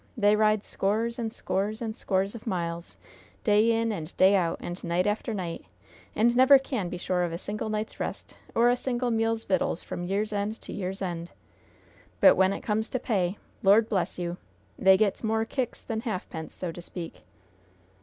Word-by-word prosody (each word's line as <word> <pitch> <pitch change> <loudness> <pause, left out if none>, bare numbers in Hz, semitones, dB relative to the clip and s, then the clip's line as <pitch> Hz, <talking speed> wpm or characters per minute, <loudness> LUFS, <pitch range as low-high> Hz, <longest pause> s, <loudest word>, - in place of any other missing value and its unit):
they 205 -1 +4
ride 215 -1 +3
scores 225 +4 -1
and 225 -2 -2
scores 210 0 -2
and 220 -2 -4
scores 195 -4 0
of 235 0 -10
miles, 170 -3 -3 0.5
day 215 +1 +4
in 230 0 +1
and 165 -5 -6
day 190 +2 +6
out, 170 -3 +1
and 175 +1 -6
night 175 +1 +1
after 210 +3 -1
night, 180 -5 -4 0.5
and 235 +2 +3
never 260 +2 +8
can 255 -9 -3
be - - -5
sure 180 0 -1
of 175 -1 0
a 165 - -3
single 210 +4 -4
night's 215 0 -3
rest - - -5 0.2
or 235 +1 +5
a - - +3
single 245 -1 -1
meal's 225 0 +1
vittals 185 -3 0
from - - -5
year's 205 +4 -1
end 205 +2 -2
to - - -8
year's 195 0 -4
end! 170 -2 -4 0.9
But - - +8
when 190 0 +4
it - - -4
comes 220 +1 -1
to 255 - -2
pay 195 -5 0 0.2
Lord 210 +3 +5
bless 195 -5 -1
you! 175 0 -3 0.4
they 190 0 +5
gets 210 +1 +1
more 220 0 +1
kicks 255 +1 -3
than 225 -1 -3
halfpence, 185 -7 -5
so 180 -2 -4
to 175 - -9
speak!" 170 -1 -8
205 Hz, 190 wpm, -27 LUFS, 180-225 Hz, 0.9 s, never